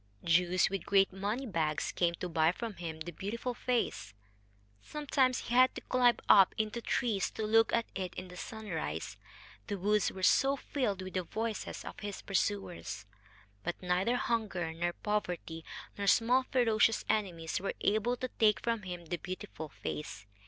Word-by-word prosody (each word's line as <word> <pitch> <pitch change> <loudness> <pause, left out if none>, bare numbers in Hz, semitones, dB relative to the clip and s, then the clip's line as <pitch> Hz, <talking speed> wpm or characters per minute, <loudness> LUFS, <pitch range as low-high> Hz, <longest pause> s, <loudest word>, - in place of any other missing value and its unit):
Jews 180 +2 +4
with 195 -3 -3
great 195 -2 +4
money 205 +7 -2
bags 160 - -1
came 170 -1 +1
to 180 - -4
buy 160 -1 +3
from 225 +4 -5
him 160 -2 -6
the 175 +2 -4
beautiful 230 +8 -4
face. 235 - -1 0.7
Sometimes 270 - +1
he 235 - -5
had 255 +1 +6
to - - -5
climb 245 -1 +3
up 195 -2 +7
into 215 +2 -1
trees 225 -6 0
to 220 - -4
look 225 +1 +4
at 230 -1 +2
it 185 -2 -4
in 185 - -6
the 180 - -11
sunrise, 170 - -4 0.5
the 200 - -2
woods 205 +2 +2
were 190 - -8
so 270 +7 +5
filled 245 -9 -2
with 185 - -7
the 185 - +1
voices 220 +5 -4
of - - -8
his 205 -2 -6
pursuers. 195 - -2 0.6
But 175 - -3
neither 185 +6 +1
hunger, 210 -9 -1
nor 175 +1 -1
poverty, 180 -6 -3 0.4
nor 200 - -1
small 245 +5 +4
ferocious 225 -3 +3
enemies 175 -7 -1
were 195 - -3
able 220 +4 +2
to 255 - -3
take 215 -2 +5
from 230 -2 0
him 175 -3 -7
the 175 +2 -3
beautiful 185 -4 -6
face. 120 -8 -6
200 Hz, 165 wpm, -32 LUFS, 175-230 Hz, 0.7 s, up